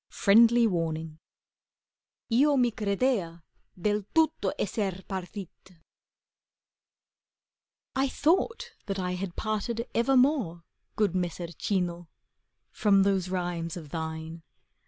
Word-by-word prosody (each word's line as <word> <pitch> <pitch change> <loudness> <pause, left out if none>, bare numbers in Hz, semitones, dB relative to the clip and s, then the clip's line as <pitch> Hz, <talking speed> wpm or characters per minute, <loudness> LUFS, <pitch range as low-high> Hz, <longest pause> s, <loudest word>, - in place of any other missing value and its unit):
FRIENDLY 230 +3 +5
WARNING 160 -5 -2 1.1
lo 280 +5 +4
mi 245 -2 +3
credea 200 -5 -1 0.4
del 210 +3 +1
tutto 320 -1 +2
esser 195 -2 -2
partit 190 -1 -7 2.2
I 270 +1 +1
THOUGHT 455 - +1 0.2
that 195 -1 -2
I 180 -1 -2
had 180 -1 -4
parted 220 +2 -2
evermore. 250 - +2 0.3
Good 210 -4 +1
Messer 175 -2 -3
Cino, 175 -1 -2 0.6
from 200 -2 +3
those 190 -2 +1
rhymes 175 -2 -3
of 155 -4 -9
thine. 160 +1 -5
195 Hz, 95 wpm, -28 LUFS, 175-230 Hz, 2.2 s, FRIENDLY